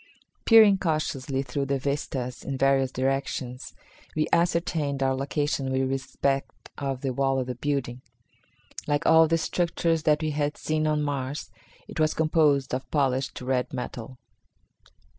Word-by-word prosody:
Peering 215 -4 +7
cautiously 150 -5 -1
through 140 +1 -3
the 140 0 +1
vistas 135 -2 -3
in 135 -1 -4
various 135 -1 +3
directions, 130 -1 -3 0.4
we 155 0 +2
ascertained 170 -5 +1
our 135 0 +2
location 140 0 -1
with 130 0 +1
respect 135 0 -2
to 135 -2 -3
the 130 -1 -2
wall 135 +1 +1
of 130 - -1
the 125 - -4
building. 125 -1 -3 0.9
Like 145 -1 0
all 160 0 +6
the 165 +1 +2
structures 165 -1 0
that 150 0 +2
we 155 - 0
had 150 0 -1
seen 155 0 -1
on 150 -1 +1
Mars, 140 -4 -3 0.4
it - - -7
was 155 0 +2
composed 155 -4 +2
of 130 -1 -3
polished 135 -2 0
red 125 0 -1
metal. 125 0 -6
140 Hz, 145 wpm, -26 LUFS, 130-155 Hz, 0.9 s, Peering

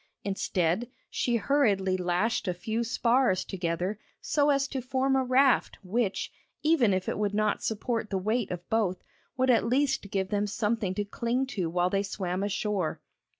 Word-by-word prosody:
Instead, 195 +2 0 0.2
she 240 - 0
hurriedly 205 -7 +2
lashed 180 +5 0
a 180 - 0
few 220 +6 -2
spars 235 -3 +2
together 180 +2 -2 0.2
so 295 -1 +1
as 275 -1 +2
to 270 -2 -4
form 265 +2 +1
a 265 - +3
raft 260 +1 +3
which, 200 +1 -1 0.3
even 300 -9 +4
if 185 -1 -1
it - - -2
would 205 -1 0
not 215 0 +1
support 225 0 -2
the 195 - -1
weight 215 +4 0
of 175 -1 -6
both, 200 -5 0 0.3
would 260 0 +4
at 235 - +4
least 255 -3 +1
give 190 -1 -1
them 205 +1 0
something 210 -2 -1
to 205 - -1
cling 235 +5 -1
to 195 -11 -3
while 175 +2 +1
they 195 - +2
swam 190 -2 -3
ashore. 205 -3 -1
210 Hz, 170 wpm, -28 LUFS, 190-245 Hz, 0.3 s, even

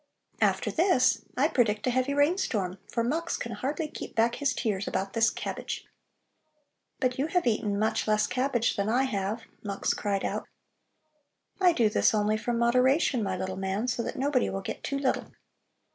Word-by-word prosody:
After - - +2
this 340 -7 +3 0.2
I 275 +4 +4
predict 225 -8 +1
a 250 - +2
heavy 255 +3 0
rainstorm, 270 - +1
for 230 - 0
Mux 325 +8 -1
can 235 - -5
hardly 275 +9 -2
keep - - -8
back 230 +1 +3
his 285 0 0
tears 205 -5 -2
about 195 0 -2
this 225 -1 +4
cabbage." - - -5 1.1
"But 255 0 0
you 285 - +1
have 355 +1 +1
eaten 210 -3 +1
much 220 +1 0
less 215 0 +3
cabbage 250 -2 0
than 200 +1 0
I 250 +4 +3
have," 215 -2 -2 0.2
Mux 200 -2 -1
cried 200 -2 -1
out. - - -3 1.1
"I 365 -2 +6
do 240 -9 +3
this 210 - +3
only 210 0 +2
from 235 +2 -2
moderation, 250 +2 +3
my 190 -3 -1
little 190 +1 -4
man, 195 +4 -2
so 245 -1 0
that - - -4
nobody 270 -1 +1
will 195 - -3
get - - -6
too 280 - -2
little." 275 -2 0
235 Hz, 175 wpm, -28 LUFS, 210-270 Hz, 1.1 s, I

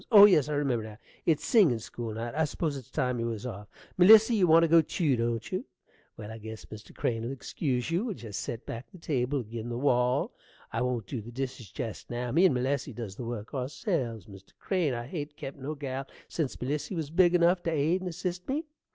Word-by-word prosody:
Oh, 205 -2 +11
yes, 155 -8 +5
I - - -1
remember 135 -6 0
now; 110 -1 -9 0.3
it's 160 -3 +2
singin' 190 - +5
school 110 0 -6
night: 115 +1 -4
I 160 +1 +2
s'pose 150 0 -2
it's 130 -4 -9
time 125 -2 -1
you 115 - -1
was 115 -1 -4
off. 105 -4 -6 0.3
Melissy, 220 +5 +8
you 195 -5 +4
want 165 +1 +7
to - - +4
go 165 +1 +7
tew, 155 -4 +1
don't 115 -1 -2
you? - - -2 0.5
Well, 110 0 -7
I 110 - -8
guess 110 0 -8
Mr. 110 0 -11
Crane'll 115 0 -1
excuse 135 0 -2
you. 180 +7 +1
We'll 220 -6 -3
jest 110 -8 -6
set 115 -1 -5
back 115 +2 -7
the - - -12
table 140 -4 -1
ag'in' 115 +1 -6
the 120 - -3
wall. 125 -2 +2 0.4
I 115 - 0
won't 125 -4 -1
dew 120 +3 -4
the 115 +3 -10
dishes 125 -3 -5
jest 110 - -6
now. 120 0 -3
Me 170 +8 +5
and 150 - +4
Melissy 130 +1 -1
does 110 -4 -6
the 120 - -6
work 115 -2 -5
ourselves, 130 - -2
Mr. 95 -1 -14
Crane. 175 -9 0
I 120 0 -4
hain't 145 +1 -6
kept 135 +1 -7
no 145 +4 -4
gal 135 -1 -4 0.2
sense 155 -6 -3
Melissy 145 +8 -2
was 155 -3 -3
big 175 +1 +5
enough 175 +1 +4
t' 170 - -1
aid 160 +4 +1
and 185 - -3
assist 180 +3 -4
me. 290 +4 0
130 Hz, 225 wpm, -29 LUFS, 115-165 Hz, 0.5 s, Oh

